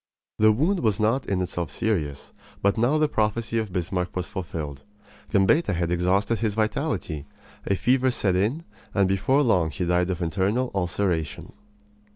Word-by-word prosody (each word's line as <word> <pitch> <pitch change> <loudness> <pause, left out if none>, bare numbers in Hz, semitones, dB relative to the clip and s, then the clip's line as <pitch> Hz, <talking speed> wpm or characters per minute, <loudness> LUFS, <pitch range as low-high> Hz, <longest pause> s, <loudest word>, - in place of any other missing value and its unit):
The 110 0 +6
wound 160 - +1
was 110 - +1
not 115 +5 +1
in 95 -2 0
itself 85 -3 -3
serious, 75 -5 -2 0.3
but 100 0 +3
now 120 +7 +2
the 155 0 +3
prophecy 115 0 0
of 110 -3 -3
Bismarck 90 0 -2
was 90 -1 -2
fulfilled. 80 -8 -5 0.5
Gambetta 100 - +3
had 85 0 -1
exhausted 95 +5 +1
his 110 -3 -1
vitality; 110 - -2 0.4
a 100 - +2
fever 130 +5 +2
set 100 -7 0
in, 115 - 0 0.3
and 100 -2 +4
before 105 +10 +2
long 90 - +2
he 90 +2 -3
died 90 +1 +1
of 90 -2 -2
internal 100 +9 0
ulceration. 90 -4 -2
100 Hz, 160 wpm, -25 LUFS, 90-115 Hz, 0.5 s, The